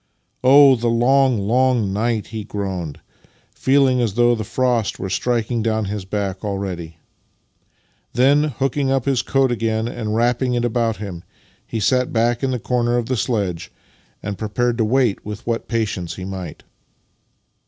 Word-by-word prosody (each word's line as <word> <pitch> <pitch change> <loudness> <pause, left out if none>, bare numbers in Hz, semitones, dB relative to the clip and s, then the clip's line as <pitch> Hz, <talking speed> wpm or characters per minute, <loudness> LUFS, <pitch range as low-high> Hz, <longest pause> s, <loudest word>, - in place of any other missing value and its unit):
" - - -48
Oh, 135 +1 +7
the 120 0 -2
long, 125 +2 +3
long 120 -4 +2
night! 110 +1 0
" - - -18
he 110 -1 -4
groaned, 95 -7 -5 0.5
feeling 130 -2 +3
as 110 -5 -1
though 120 0 +4
the 110 -2 -2
frost 115 -1 0
were 95 0 -5
striking 115 +2 0
down 110 -1 0
his 100 -1 -4
back 95 -1 -3
already. 95 -5 -4 1.2
Then, 140 +4 +4
hooking 135 0 -1 0.2
his 135 -3 +1
coat 135 -2 +1
up - - +1
again 110 0 -1
and 110 -3 -3
wrapping 120 +2 +1
it 120 0 0
about 115 -1 0
him, 95 -5 -7 0.4
he 115 - -3
sat 125 +5 +1
back 120 +1 +1
in 135 - 0
the 130 - -1
corner 120 0 0
of 120 - -1
the 130 - -1
sledge, 95 -7 -2 0.5
and 100 -1 -5
prepared 120 +3 -1
to 110 - +3
wait 120 -2 +1
with 105 +1 -7
what 115 -1 -2
patience 105 -7 -2
he 90 - -7
might. 95 -4 -7
115 Hz, 165 wpm, -20 LUFS, 105-125 Hz, 1.2 s, Oh